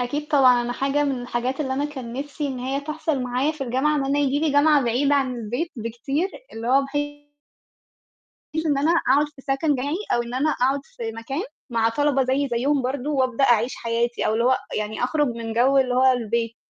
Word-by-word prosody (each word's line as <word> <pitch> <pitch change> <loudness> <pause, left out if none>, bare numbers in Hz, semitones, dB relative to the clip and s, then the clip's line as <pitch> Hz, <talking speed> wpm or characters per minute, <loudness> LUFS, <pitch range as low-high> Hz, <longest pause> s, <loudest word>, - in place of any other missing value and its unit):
أكيد 290 +5 -3
طبعًا، 260 -5 +5
أنا 240 0 -3
حاجة 275 +3 0
من 270 -3 -2
الحاجات 245 +3 -2
اللي 265 -3 -1
أنا 280 +2 -1
كان 265 -6 -6
نفسي 285 +3 -4
إن 265 -2 -4
هي 265 +3 -2
تحصل 305 -1 -2
معايا 250 +4 0
في 300 -3 -5
الجامعة، 265 +5 +1
إن 280 - 0
أنا 275 +1 0
ييجي 285 -1 +1
لي 305 -1 +1
جامعة 290 0 +5
بعيدة 270 +5 +2
عن 270 -3 +1
البيت 240 +9 -3
بكتير، 250 - -2 0.2
اللي 225 +1 -5
هو 270 +2 +4
بحيث 290 +1 -4 1.4
إن 290 -3 +2
أنا 295 +4 +2
أقعُد 295 -3 +3
في 290 -2 -17
سَكَن 275 +2 0
جامعي، 280 +4 -2 0.2
أو 240 - +2
إن 235 +1 -8
أنا 275 +5 +1
أقعُد 270 -1 +1
في 225 -1 -6
مكان 230 +7 -4 0.3
مع 230 -1 +2
طَلَبة 275 +2 +1
زيي 265 +2 0
زيُّهم 270 +4 +1
برضه، 260 +2 -3
وأبدأ 260 -2 +1
أعيش 240 -1 +3
حياتي 235 +1 -1
أو - - +1
اللي 230 +1 +1
هو 260 +1 +4 0.2
يعني 215 +2 -3
أخرُج 295 +3 +1
من 230 -2 -4
جَوّ 255 +4 +3
اللي 255 -2 +2
هو 260 +1 +5
البيت، 230 -1 -1
265 Hz, 210 wpm, -23 LUFS, 240-290 Hz, 1.4 s, طبعًا